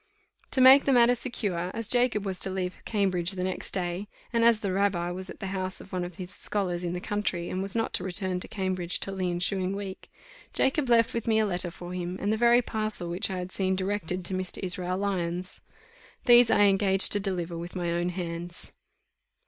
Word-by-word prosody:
To 260 - +2
make 265 +2 +8
the 275 - +3
matter 240 0 +5
secure, 205 -8 -3
as 230 -1 0
Jacob 240 -4 +1
was 190 -2 -3
to - - -1
leave 185 -1 -3
Cambridge 190 -4 +1
the 180 -1 -3
next 185 0 -3
day, 180 +1 -3 0.3
and 230 0 +2
as 230 -2 +4
the 195 -3 -2
rabbi 185 -3 0
was 185 +1 -7
at - - -10
the 195 - -5
house 185 -1 -4
of 195 - -14
one 180 -1 -1
of 175 -1 -7
his 180 0 -8
scholars 180 -5 -2
in 175 0 -2
the 180 - -3
country, 185 -3 -2
and 185 - -2
was 195 +1 -3
not 225 -1 -1
to - - +1
return 185 0 -2
to - - -7
Cambridge 185 -3 0
till 195 - -1
the 185 -1 -1
ensuing 185 +2 -1
week, 195 -2 -7 0.4
Jacob 270 0 +1
left 230 -1 +4
with 230 -1 -3
me 220 -1 +3
a 220 - +3
letter 180 -2 -1
for 175 +1 -9
him, 180 0 -4
and 205 +2 0
the - - +2
very 240 +2 +4
parcel 215 -6 -3
which 185 +6 0
I 190 - -3
had 180 0 -5
seen 190 -1 0
directed 185 -2 -2
to 190 - 0
Mr. 185 0 -2
Israel 180 0 -2
Lyons: 185 -2 -3 0.6
these 240 -1 +7
I - - +4
engaged 195 -1 +6
to 205 - +4
deliver 180 -4 -3
with 170 +2 -7
my 175 -2 -2
own 175 +1 -1
hands. 175 -1 -6
190 Hz, 220 wpm, -27 LUFS, 180-210 Hz, 0.6 s, make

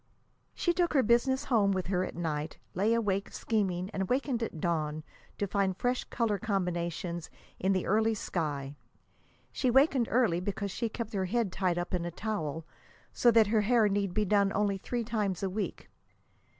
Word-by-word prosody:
She 345 - +1
took 345 -1 +1
her 265 - +5
business 260 +4 +3
home 215 -8 +3
with 185 -1 -1
her 185 0 0
at - - -5
night, 155 -2 -3 0.2
lay 210 +6 +2
awake 200 -3 0
scheming, 190 -4 -1
and 190 -3 -2
wakened 255 -2 0
at 220 -8 -4
dawn 155 -2 -1 0.3
to 205 - 0
find 195 -1 0
fresh 250 +3 0
color 220 -4 -1
combinations 175 -3 -2 0.3
in 190 - +1
the 185 - 0
early 220 +2 +2
sky. 145 -8 -3 0.8
She 255 - 0
wakened 265 -1 +4
early 225 -8 +2
because 200 +1 -3
she 230 +4 -2
kept 225 0 -5
her 190 -2 0
head 220 0 0
tied 180 -2 0
up 175 +2 -3
in 180 -2 0
a 175 - -2
towel, 165 -5 -3 0.5
so 240 - +4
that 225 -1 +6
her 220 - +4
hair 225 0 +4
need 200 -2 -1
be 215 - +2
done 200 0 +3
only 200 -1 +1
three 240 +4 -2
times 210 -5 -2
a 190 - -1
week. 205 +1 -4
200 Hz, 180 wpm, -30 LUFS, 180-230 Hz, 0.8 s, that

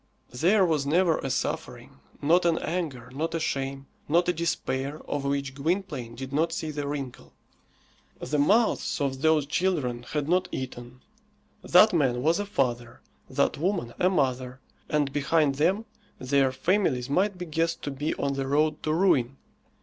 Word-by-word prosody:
There 185 - +3
was 155 -5 0
never 170 +2 +3
a 135 - -3
suffering, - - -4 0.2
not 170 +5 +4
an 170 -1 +2
anger, 150 -8 -4
not 160 +4 -2
a - - 0
shame, 135 -2 -3 0.2
not 170 +3 +3
a 180 - +2
despair, 145 -4 -2
of 145 -1 -3
which 140 -1 -1
Gwynplaine 140 -6 -2
did 135 +2 -7
not 160 +3 +1
see 160 -1 -3
the 145 -1 -4
wrinkle. 140 -3 -6 0.9
The 150 - -2
mouths 210 +9 +2
of 135 -2 -2
those 160 -2 +3
children 150 -7 -1
had 145 +4 -3
not 180 +2 +2
eaten. 125 -1 -7 0.6
That 185 +4 +6
man 130 -7 +1
was 165 +5 +3
a 205 - -3
father, 120 - -2 0.3
that - - 0
woman 170 -9 -1
a 180 - +4
mother, 130 -6 -1 0.3
and 145 -2 0
behind 145 0 +2
them 195 +7 +2 0.3
their 135 0 +2
families 130 -3 0
might 185 +7 +1
be 180 - -5
guessed 165 +1 -1
to 145 - -3
be 145 +3 -2
on 140 0 -1
the 135 -1 -3
road 150 +2 +1
to 155 - -1
ruin. 145 -8 +2
145 Hz, 165 wpm, -27 LUFS, 135-170 Hz, 0.9 s, That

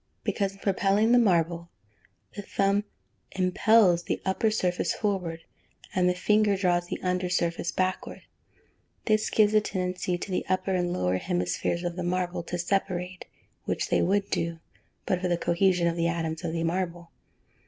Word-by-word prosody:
_ - - -48
Because, 195 -2 -1
in - - -16
propelling 200 +3 +2
the 245 - +6
marble, 170 -5 +1 0.7
the 205 - -5
thumb 200 +1 0 0.5
impels 185 0 +4
the - - -3
upper 190 +4 +1
surface 180 -4 0
forward, 180 -6 -2 0.5
and 180 -1 +3
the 180 - 0
finger 210 +2 +2
draws 175 -2 +1
the - - -4
under 180 0 0
surface 170 -1 -1
backward. 185 0 -2 0.8
This 215 -1 +2
gives 215 -1 +3
a 215 - +5
tendency 180 -2 -2
to 190 - -6
the 180 - 0
upper 185 +1 0
and 175 -1 0
lower 90 - 0
hemispheres 90 - -1
of 175 0 -3
the 180 - -2
marble 180 0 -1
to 175 - -3
separate, 180 0 -2 0.4
which - - -2
they - - +2
would 200 +2 +1
do, 165 0 -1 0.5
but 180 -1 0
for 185 - 0
the 175 -1 +1
cohesion 175 +1 +2
of 170 0 +1
the 170 0 +1
atoms 165 -1 -2
of 170 - -2
the 165 -1 -1
marble. 170 0 -3
180 Hz, 170 wpm, -27 LUFS, 170-195 Hz, 0.8 s, the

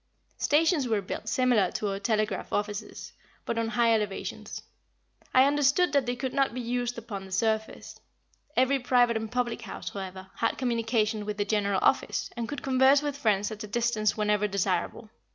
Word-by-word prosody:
Stations 305 -2 +2
were 220 -3 +1
built 200 +3 -5
similar 245 -8 +3
to 210 - -2
our 195 0 -3
telegraph 215 -2 -1
offices, 205 0 -4 0.3
but 230 - -1
on 230 - 0
high 230 0 +3
elevations. 210 -3 -3 0.7
I 260 +1 +6
understood 290 +4 +3
that 280 -3 +2
they 245 - 0
could 255 +1 -4
not 275 -3 +1
be - - -3
used 245 0 -2
upon 215 -4 -6
the 190 - -12
surface. 220 +3 -2 0.6
Every 260 +2 +3
private 245 -1 +3
and 220 0 -3
public 240 -1 -1
house, 215 - -7
however, 190 -1 -7
had 230 - 0
communication 230 -3 0
with 210 0 -4
the 205 - 0
general 200 -2 +1
office, - - +1
and 230 -2 -4
could 290 - -5
converse 265 +2 +4
with 290 -1 -2
friends 215 -6 +1
at 215 0 -6
a - - -6
distance 220 -1 0
whenever 210 -1 +1
desirable. 200 +2 -2
230 Hz, 175 wpm, -28 LUFS, 210-250 Hz, 0.7 s, I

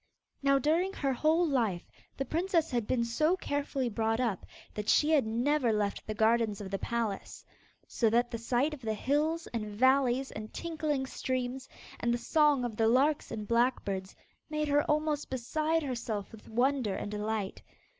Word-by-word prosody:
Now 275 0 +4
during 330 +8 +1
her 275 -6 -1
whole 320 +6 +2
life, 225 - 0 0.3
the 270 - -2
princess 335 0 0
had 240 -4 -1
been 235 -2 +1
so 305 +10 +1
carefully 285 -5 -2
brought 225 0 0
up, 230 -7 -1 0.3
that 210 0 -4
she 305 +1 +4
had 285 -8 +3
never 245 +3 +1
left 210 -2 -1
the 215 - -3
gardens 220 -1 +2
of 195 -2 -7
the 195 - -2
palace, 230 -4 -3 0.4
so 230 - +1
that 240 +2 +2
the 230 - -4
sight 250 +6 +1
of 295 - -8
the 220 -2 -2
hills 305 +7 0
and 220 -2 -2
valleys 260 +2 +3
and 215 0 -7
tinkling 310 -5 -2
streams, 255 0 -3 0.3
and 235 - 0
the 240 - +1
song 290 +1 +3
of 225 -3 -5
the 225 - +3
larks 275 +6 +2
and 215 -2 -5
blackbirds, 230 -6 0 0.3
made 305 0 -1
her 290 +1 +4
almost 300 -1 0
beside 310 +6 0
herself 230 -6 -4
with 220 -2 -13
wonder 245 -2 +1
and 205 - -4
delight. 210 -1 -3
250 Hz, 175 wpm, -31 LUFS, 220-295 Hz, 0.4 s, Now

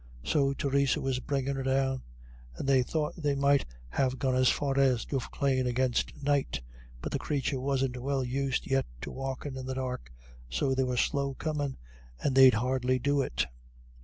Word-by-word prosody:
So 140 - +2
Theresa 140 +1 +1
was 135 -2 -1
bringing 140 0 -1
her - - -2
down, 135 0 +1 0.5
and - - -5
they 135 -2 +5
thought 150 +4 -1
they 150 -4 0
might 140 0 +3 0.2
have 130 - 0
got 130 -1 +1
as 130 0 +4
far 140 -1 +1
as 130 -4 +3
Duffclane 130 -1 0
against 125 +2 0
night; 140 - +1 0.4
but - - -3
the - - -1
creature 140 -2 -1
wasn't 130 -2 -1
well 135 0 0
used 135 +1 -1
yet 135 0 +1
to - - -5
walking 135 +1 -4
in 130 0 -6
the 130 - -3
dark, 125 - -4 0.4
so 60 - +1
they 130 0 +2
were 125 -1 -1
slow 140 +1 +1
coming, 145 -3 -2 0.4
and 140 - 0
they'd 130 -2 +8
hardly 130 +2 +1
do 140 +3 +1
it. 60 - 0
135 Hz, 175 wpm, -30 LUFS, 130-140 Hz, 0.5 s, they'd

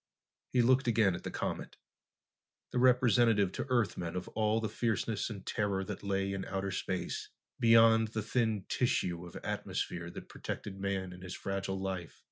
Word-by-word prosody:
He 125 -2 +4
looked 130 +2 +4
again 110 -5 +4
at 90 - -5
the - - -3
comet, - - -4 0.9
the 125 - 0
representative 120 -5 +4
to - - -4
Earthmen 100 -8 0
of 90 - -3
all 110 0 +1
the 110 - -1
fierceness 110 -1 -1
and 100 -4 -7
terror 100 -2 0
that 105 0 -6
lay 100 -1 -1
in 95 -1 -3
outer 95 0 -2
space, 95 -1 -3 0.3
beyond 115 -1 +6
the 110 0 -3
thin 110 -3 0
tissue 90 -8 0
of 85 - -13
atmosphere 85 0 -3
that - - -9
protected 95 -1 -6
man 95 -2 -2
and 90 - -12
his 95 0 -6
fragile 95 0 -3
life. 95 -3 -4
100 Hz, 165 wpm, -32 LUFS, 95-115 Hz, 0.9 s, beyond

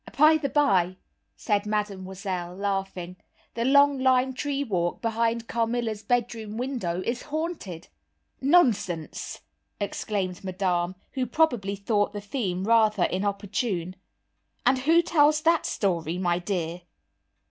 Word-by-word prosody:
"By 310 +2 +7
the 290 -3 -2
by," 190 - +2 0.4
said 205 - 0
Mademoiselle, 190 -3 -3
laughing, 195 -2 -3 0.4
"the 230 - -2
long 280 +1 +5
lime 260 0 +3
tree 285 +1 -2
walk, 175 -8 -1
behind 230 0 0
Carmilla's 230 -2 -1
bedroom 225 -3 -1
window, 230 -9 -2
is 240 +1 -2
haunted!" 305 - -5 0.5
"Nonsense!" 230 - +1 0.4
exclaimed 195 -3 -3
Madame, 185 -1 -1 0.2
who 260 -2 -2
probably 235 -10 +1
thought 205 +1 0
the 205 - -4
theme 200 -4 -3
rather 215 -3 +4
inopportune, 195 -1 -1 0.7
"and 255 +1 +4
who 325 +6 +4
tells 305 -2 +4
that 330 +1 +3
story, 170 -4 -1
my 175 -1 +1
dear?" 175 -2 -3
210 Hz, 115 wpm, -26 LUFS, 185-255 Hz, 0.7 s, By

